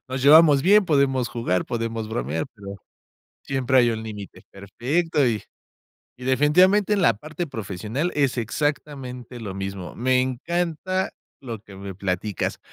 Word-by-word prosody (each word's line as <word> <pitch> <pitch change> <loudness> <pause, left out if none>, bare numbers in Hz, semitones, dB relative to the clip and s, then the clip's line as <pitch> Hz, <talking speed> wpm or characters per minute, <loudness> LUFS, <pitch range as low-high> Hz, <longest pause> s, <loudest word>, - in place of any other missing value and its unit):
Nos 130 0 -3
llevamos 145 -1 +7
bien, 205 +2 +5
podemos 135 -5 +2
jugar, 90 -7 -1
podemos 115 -2 -3
bromear, 80 - -2
pero 100 -2 -9 0.7
siempre 130 -1 +1
hay 120 -1 +5
un 110 -1 -3
límite. 105 -3 -9
Perfecto 135 - 0
y 110 -3 0 0.8
y 125 - -9
definitivamente, 180 +10 +4
en 200 - +1
la 115 - +5
parte 155 - -6
profesional 110 - -3
es 135 -4 +1
exactamente 125 0 -3
lo 105 -4 -6
mismo. 95 -1 -6
Me 130 +1 +2
encanta 170 +7 -2 0.3
lo 115 -4 -6
que 100 -2 -14
me 100 0 -7
platicas. 95 +1 -2
125 Hz, 140 wpm, -23 LUFS, 105-150 Hz, 0.8 s, llevamos